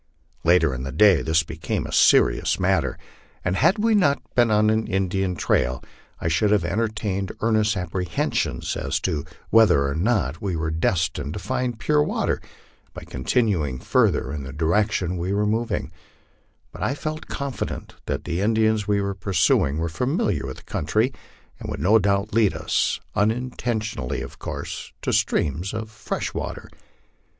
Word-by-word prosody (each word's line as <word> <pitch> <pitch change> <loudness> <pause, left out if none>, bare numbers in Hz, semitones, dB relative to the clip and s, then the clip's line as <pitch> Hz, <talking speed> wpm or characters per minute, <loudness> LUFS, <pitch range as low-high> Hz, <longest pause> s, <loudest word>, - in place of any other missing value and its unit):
Later 85 -4 +4
in 65 - -4
the 70 +1 -4
day 100 +3 +5
this 80 0 +2
became - - -3
a - - -7
serious - - +4
matter, - - +1 0.5
and 90 - +1
had 170 - +3
we 225 +2 +2
not 145 -10 +3
been 120 -2 +4
on 105 0 +4
an 110 0 0
Indian 95 -2 0
trail,! 65 -5 0 0.4
should 85 +6 +2
have 105 -5 +2
entertained 100 -1 -1
earnest 110 -2 +2
apprehensions 90 -1 -2
as - - -1
to 75 -3 -1 0.3
whether 90 -11 +5
or 70 - -1
not 85 - 0
we 95 -4 -2
were 80 0 -2
destined 80 -2 0
to - - -5
find 125 -2 -2
pure 150 +6 +2
water - - 0 0.5
by - - -7
continuing 75 - 0
further 65 - +1
in 75 - -4
the 65 0 -7
direction 90 - 0
we 90 +3 -2
were 105 +1 +1
then 105 - +1
moving; 115 0 -2 0.8
but 85 - -11
I 125 +8 0
felt 155 +1 -5
confident 140 -2 -4
that - - -2
the 85 +2 -2
Indians 110 -1 +2
we 100 -1 +2
were 100 0 -1
pursu 90 -7 +2
ing 70 - -3
were 85 +1 -1
familiar 100 - -1
with 65 - -6
the - - -14
country, 110 - 0 0.5
and - - -7
would - - -4
no 105 +9 +5
doubt 100 +1 0
lead 110 -3 +3
us, - - 0 0.2
unintention 110 0 -1
ally 60 - -3
of - - -9
course, - - -6
to - - 0
streams 85 +8 0
of 110 0 -5
fresh 105 - -4
water. - - -5
100 Hz, 165 wpm, -23 LUFS, 80-110 Hz, 0.8 s, day